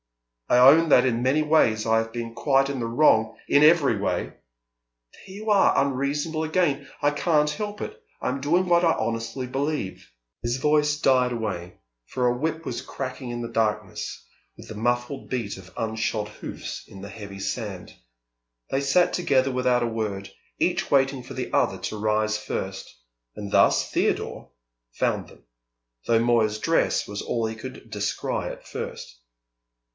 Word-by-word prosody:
"I - - +5
own 150 +6 +7
that 125 -2 +6
in 120 -2 +1
many 135 +5 +2
ways 115 -9 +3
I 115 0 +3
have 115 0 -3
been 115 -1 -5
quite 135 +2 +2
in 140 -2 -3
the 115 - -2
wrong 115 -3 +3
" - - -31
"In 145 - +5
every 150 -7 +5
way!" 100 - -2 0.8
"There - - -17
you 215 +2 -5
are 200 -2 +4
unreasonable 140 +4 -1
again. 155 -4 0
I 145 0 +3
can't 150 0 +2
help 210 +3 -5
it. - - -6 0.2
I - - -1
am 135 +2 -3
doing 170 +6 +2
what 170 0 +4
I 165 -1 +4
honestly 115 +3 -3
believe 135 - -3
" - - -60
His 120 +2 0
voice 150 +1 +2
died 130 -3 +3
away, 100 -7 -4 0.3
for 125 -1 -1
a 120 - +2
whip 160 +5 -3
was - - -3
cracking 130 -1 -6
in 120 0 -4
the 115 - -3
darkness, 105 -4 -2 0.3
with - - -12
the 110 - -8
muffled 120 +4 -2
beat 120 -6 -3
of 95 -1 -13
unshod 110 -1 -2
hoofs - - -7
in 95 - -12
the 100 - -8
heavy 100 -1 -9
sand. 95 -2 -4 0.8
They 135 - +1
sat 175 +6 +3
together 135 -6 +2
without 125 -1 +2
a - - +1
word, 105 -4 -4 0.3
each - - 0
waiting 135 -1 +3
for - - -9
the - - -5
other - - +2
to 110 - -5
rise 105 0 +1
first; 95 -2 -5 0.4
and 100 -1 -6
thus - - +4
Theodore - - -1 0.4
found - - -1
them, - - -18 0.6
though 115 -1 +4
Moya's 115 -2 +2
dress 165 +9 +1
was 100 0 -5
all 115 -1 -1
he 110 0 -3
could 125 0 -9
descry 105 -1 -2
at - - -10
first. - - -7
125 Hz, 170 wpm, -25 LUFS, 110-145 Hz, 0.8 s, own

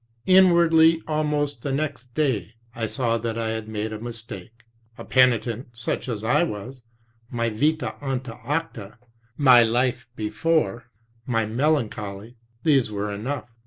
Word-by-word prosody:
"Inwardly, 170 -3 +5
almost 150 -4 -1
the 140 - -3
next 135 -3 -3
day, 130 -7 -1 0.2
I 115 -2 -3
saw 115 -1 0
that 115 0 -3
I 115 -1 -1
had 110 -1 -4
made 110 0 -4
a 110 - -6
mistake. 115 -1 -9 0.3
A - - -9
penitent 125 -2 +2
such 120 +2 -3
as 110 -3 -3
I 120 +7 +3
was, 130 -4 -4 0.5
my 115 -1 -1
mta 150 +8 0
anta 130 -4 -4
acta, 120 -8 -4 0.4
my 130 -4 +7 1.9
melancholy, 110 -4 -2 0.3
these 140 -7 +3
were 105 0 -3
enough. 120 +5 -5
120 Hz, 125 wpm, -24 LUFS, 110-145 Hz, 1.9 s, my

